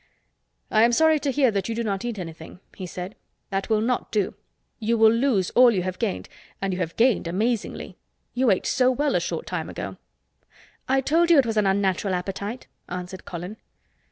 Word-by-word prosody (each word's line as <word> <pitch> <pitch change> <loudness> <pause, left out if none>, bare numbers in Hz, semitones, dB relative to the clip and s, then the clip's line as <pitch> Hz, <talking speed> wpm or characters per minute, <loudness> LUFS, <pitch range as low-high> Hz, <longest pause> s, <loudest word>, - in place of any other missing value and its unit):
"I 215 - +4
am 235 +1 +5
sorry 315 +3 +4
to 285 - -1
hear 265 -3 +3
that 200 0 -2
you 225 - -2
do 235 - -1
not 200 -2 -2
eat 240 -3 -3
anything," 165 -1 -8 0.2
he 185 - -6
said. 180 +3 -6 0.4
"That 195 +2 -2
will 215 -1 +2
not 245 +2 -1
do. 205 -4 0 0.5
You 230 +1 +1
will 220 0 +6
lose 230 -6 +1
all 250 0 +7
you 195 -6 0
have 185 0 -4
gained—and 195 -2 -4
you 180 - -3
have 170 -2 -3
gained 230 -7 +3
amazingly. 215 +6 -2 0.4
You 250 0 +2
ate 190 - +2
so 255 -2 +3
well 285 +3 +1
a - - +3
short - - -4
time - - -4
ago." - - -6 0.9
"I 270 0 +3
told 330 +6 +2
you 335 - +7
it 275 - +5
was 225 -1 -2
an 210 -2 +3
unnatural 195 0 +1
appetite," 200 +6 -4 0.2
answered 180 +1 -6
Colin. 180 +5 -6
215 Hz, 195 wpm, -24 LUFS, 185-245 Hz, 0.9 s, all